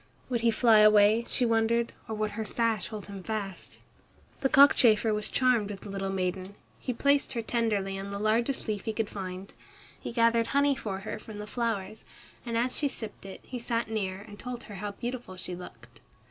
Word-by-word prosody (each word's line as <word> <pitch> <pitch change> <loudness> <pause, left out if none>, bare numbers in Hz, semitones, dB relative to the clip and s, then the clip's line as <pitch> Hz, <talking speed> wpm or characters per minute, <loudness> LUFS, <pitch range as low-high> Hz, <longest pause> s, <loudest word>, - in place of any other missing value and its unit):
Would 240 -2 0
he 235 - +4
fly 225 -1 +5
away, 215 +2 +6
she 250 - +1
wondered, 230 +1 +2
or 220 - -3
would 215 0 -1
her 220 +1 -3
sash 225 0 0
hold 215 -2 -7
him 200 -1 -8
fast? 200 -2 -5 0.6
The 270 - +1
cockchafer 235 -6 +6
was 210 0 -1
charmed 250 -5 +2
with 200 -2 -7
the 205 - -9
little 195 0 -3
maiden. 185 +1 -2 0.2
He 255 - -3
placed 280 +3 +2
her 230 -2 -2
tenderly 210 -5 -1
on 195 +1 -6
the 200 - -4
largest 230 +6 0
leaf 210 -3 -3
he 220 - -1
could 220 -1 -2
find. 190 -1 -6 0.5
He - - -6
gathered 230 -1 +3
honey 280 +1 +3
for 195 -6 -4
her 215 - -5
from 215 -1 -10
the 210 - -5
flowers, 215 -2 -3 0.4
and 230 -1 -1
as 245 +2 +1
she 295 - +2
sipped 220 -6 -7
it, 190 - -9
he 250 - -6
sat 230 -1 -2
near 195 -3 -2
and 205 -1 -12
told 245 -1 -6
her 205 - -10
how 205 -1 -4
beautiful 240 -3 -5
she 180 -1 -6
looked. 180 - -12
220 Hz, 200 wpm, -29 LUFS, 200-235 Hz, 0.6 s, away